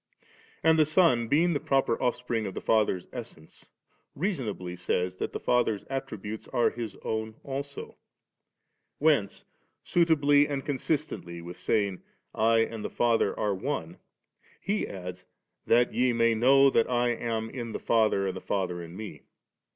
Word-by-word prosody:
And 160 Hz, 0 st, +5 dB
the 155 Hz, -, +6 dB
Son, 155 Hz, -8 st, +3 dB
being 165 Hz, +7 st, +3 dB
the 145 Hz, -, 0 dB
proper 135 Hz, -4 st, +1 dB
Offspring 120 Hz, -3 st, -1 dB
of 95 Hz, -, -7 dB
the -, -, -3 dB
Father's 105 Hz, -5 st, +1 dB
Essence, 115 Hz, -10 st, -10 dB, 0.5 s
reasonably 120 Hz, -, -3 dB
says 90 Hz, +1 st, -1 dB
that -, -, -3 dB
the -, -, -4 dB
Father's 120 Hz, -4 st, +1 dB
attributes 110 Hz, -6 st, -5 dB
are 120 Hz, -2 st, +2 dB
His 115 Hz, -3 st, -6 dB
own 110 Hz, 0 st, -3 dB
also; 140 Hz, +1 st, -6 dB, 1.0 s
whence 145 Hz, -10 st, +1 dB, 0.4 s
suitably 145 Hz, -4 st, +4 dB
and 140 Hz, -1 st, -3 dB
consistently 145 Hz, -, -2 dB
with 85 Hz, +1 st, -9 dB
saying, 100 Hz, -4 st, 0 dB, 0.2 s
* -, -, -49 dB
I 115 Hz, +1 st, +3 dB
and 115 Hz, -1 st, -3 dB
the -, -, -3 dB
Father 115 Hz, -4 st, +1 dB
are 105 Hz, -1 st, +1 dB
One,' 95 Hz, -, -4 dB, 0.6 s
He 205 Hz, +2 st, -1 dB
adds, 90 Hz, -1 st, -7 dB, 0.4 s
'that 120 Hz, +1 st, +4 dB
ye 125 Hz, 0 st, +2 dB
may 115 Hz, 0 st, +3 dB
know 135 Hz, +4 st, +5 dB
that 115 Hz, -, +2 dB
I 120 Hz, -1 st, +2 dB
am 115 Hz, -1 st, -2 dB
in 120 Hz, -3 st, -5 dB
the -, -, -4 dB
Father 110 Hz, -4 st, +2 dB
and 95 Hz, -, -2 dB
the -, -, -6 dB
Father 90 Hz, -3 st, -2 dB
in 85 Hz, +2 st, -9 dB
Me'.' 110 Hz, 0 st, -8 dB
115 Hz, 155 wpm, -28 LUFS, 100-140 Hz, 1.0 s, the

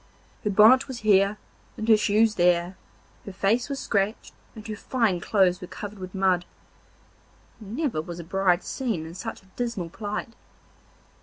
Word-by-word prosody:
Her 210 Hz, -, 0 dB
bonnet 220 Hz, +6 st, +6 dB
was 255 Hz, -3 st, -7 dB
here 200 Hz, -1 st, +3 dB, 0.4 s
and 220 Hz, -, -4 dB
her 225 Hz, -, +7 dB
shoes 215 Hz, +1 st, +3 dB
there, 175 Hz, 0 st, +2 dB, 0.5 s
her 200 Hz, -, -8 dB
face 215 Hz, +7 st, 0 dB
was 280 Hz, -, -3 dB
scratched, 200 Hz, +1 st, -1 dB, 0.2 s
and 220 Hz, -1 st, -10 dB
her 215 Hz, -, -4 dB
fine 215 Hz, -4 st, 0 dB
clothes 185 Hz, -1 st, +2 dB
were 180 Hz, -, -7 dB
covered 205 Hz, +1 st, -8 dB
with 185 Hz, +1 st, -8 dB
mud. 190 Hz, -2 st, +2 dB, 1.2 s
Never 225 Hz, -, -2 dB
was 170 Hz, +2 st, -8 dB
a -, -, -6 dB
bride 185 Hz, +1 st, +1 dB
seen 225 Hz, -, -3 dB
in 165 Hz, -, -9 dB
such 185 Hz, -, -7 dB
a 190 Hz, -, -25 dB
dismal 230 Hz, -8 st, -3 dB
plight. 210 Hz, +3 st, -5 dB
200 Hz, 160 wpm, -25 LUFS, 185-220 Hz, 1.2 s, her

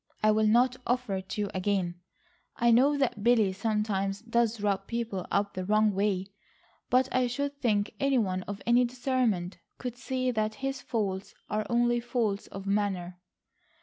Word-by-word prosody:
I 215 Hz, -, +6 dB
will 215 Hz, 0 st, +3 dB
not 245 Hz, +3 st, +4 dB
offer 245 Hz, -5 st, 0 dB
it 190 Hz, 0 st, -8 dB
to 210 Hz, -, -2 dB
you 205 Hz, -, -1 dB
again. 185 Hz, -2 st, -1 dB, 0.6 s
I 235 Hz, 0 st, +3 dB
know 275 Hz, +5 st, +5 dB
that 245 Hz, -7 st, 0 dB
Billy 225 Hz, -5 st, +4 dB
sometimes 205 Hz, -2 st, -1 dB
does 230 Hz, -1 st, +1 dB
rub 200 Hz, -1 st, -1 dB
people 230 Hz, -5 st, -3 dB
up 200 Hz, 0 st, 0 dB
the 185 Hz, -, -3 dB
wrong 215 Hz, +2 st, +3 dB
way, 195 Hz, -1 st, 0 dB, 0.6 s
but 255 Hz, +1 st, +4 dB
I 255 Hz, -1 st, +3 dB
should 280 Hz, +3 st, -3 dB
think 205 Hz, -4 st, +1 dB
any 275 Hz, -1 st, +2 dB
one 185 Hz, -5 st, 0 dB
of 200 Hz, 0 st, -6 dB
any 240 Hz, +1 st, +5 dB
discernment 240 Hz, -7 st, -1 dB, 0.2 s
could 245 Hz, -1 st, -5 dB
see 255 Hz, 0 st, -1 dB
that 215 Hz, -2 st, -1 dB
his 270 Hz, -2 st, -2 dB
faults 200 Hz, -6 st, -3 dB, 0.2 s
are 215 Hz, 0 st, -1 dB
only 240 Hz, 0 st, +2 dB
faults 230 Hz, -4 st, -1 dB
of 195 Hz, 0 st, -8 dB
manner." 195 Hz, -3 st, -1 dB
215 Hz, 170 wpm, -29 LUFS, 200-245 Hz, 0.6 s, I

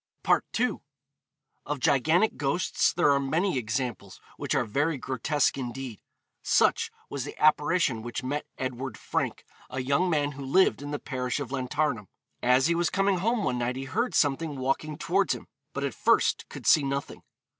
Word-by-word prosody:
II. -, -, +1 dB, 0.8 s
Of 145 Hz, 0 st, -3 dB
gigantic 160 Hz, -, +3 dB
ghosts 145 Hz, +6 st, +1 dB
there 170 Hz, -4 st, +3 dB
are 140 Hz, -, +3 dB
many 155 Hz, +3 st, 0 dB
examples 120 Hz, -1 st, -4 dB, 0.2 s
which -, -, -2 dB
are 135 Hz, -3 st, +2 dB
very 145 Hz, +8 st, 0 dB
grotesque 135 Hz, +3 st, 0 dB
indeed. 125 Hz, -3 st, -6 dB, 0.4 s
Such -, -, +3 dB, 0.2 s
was 140 Hz, -3 st, -4 dB
the 145 Hz, -, -8 dB
apparition 150 Hz, -4 st, +3 dB
which 120 Hz, +2 st, -5 dB
met 145 Hz, +3 st, -3 dB
Edward 130 Hz, -2 st, -4 dB
Frank, -, -, -3 dB, 0.2 s
a 130 Hz, -, -4 dB
young 140 Hz, +8 st, +1 dB
man 145 Hz, -3 st, +1 dB
who 140 Hz, -1 st, -8 dB
lived 140 Hz, +4 st, +3 dB
in 145 Hz, -, -6 dB
the 145 Hz, -, -2 dB
parish 130 Hz, -2 st, -3 dB
of 140 Hz, -3 st, -5 dB
Llantarnam. 130 Hz, -4 st, -1 dB, 0.3 s
As 125 Hz, +2 st, +4 dB
he 170 Hz, -, +3 dB
was 170 Hz, 0 st, +1 dB
coming 195 Hz, -1 st, +1 dB
home 225 Hz, +3 st, +1 dB
one 125 Hz, -7 st, 0 dB
night 120 Hz, +1 st, -1 dB
he 135 Hz, -, -4 dB
heard 235 Hz, -, -1 dB
something 145 Hz, 0 st, +1 dB
walking 135 Hz, +3 st, -1 dB
towards -, -, +1 dB
him, -, -, -10 dB, 0.3 s
but -, -, -4 dB
at -, -, -1 dB
first -, -, +2 dB
could -, -, -9 dB
see 155 Hz, -, +6 dB
nothing. 140 Hz, 0 st, -3 dB
140 Hz, 170 wpm, -27 LUFS, 130-155 Hz, 0.8 s, see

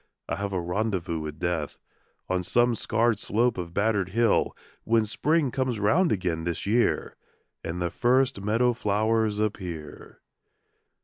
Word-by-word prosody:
I -, -, -2 dB
have 100 Hz, 0 st, -3 dB
a 95 Hz, -, -1 dB
rendezvous 90 Hz, -2 st, -2 dB
with 75 Hz, -1 st, -6 dB
Death 85 Hz, -3 st, -2 dB, 0.5 s
On 95 Hz, -1 st, 0 dB
some 120 Hz, +6 st, +2 dB
scarred 115 Hz, -1 st, +1 dB
slope 115 Hz, +1 st, +1 dB
of 85 Hz, -1 st, -5 dB
battered 100 Hz, -1 st, +1 dB
hill, 115 Hz, +2 st, +2 dB, 0.3 s
When 115 Hz, -1 st, +2 dB
Spring 145 Hz, +6 st, +1 dB
comes 130 Hz, -4 st, -1 dB
round 155 Hz, -, +3 dB
again 90 Hz, -5 st, -1 dB
this 85 Hz, -1 st, -3 dB
year 115 Hz, +4 st, +1 dB, 0.5 s
And 85 Hz, +1 st, -4 dB
the 85 Hz, -1 st, -1 dB
first 125 Hz, -3 st, +2 dB
meadow 115 Hz, +4 st, +2 dB
flowers 110 Hz, 0 st, +1 dB
appear. 90 Hz, -8 st, -5 dB
105 Hz, 140 wpm, -26 LUFS, 90-115 Hz, 0.5 s, round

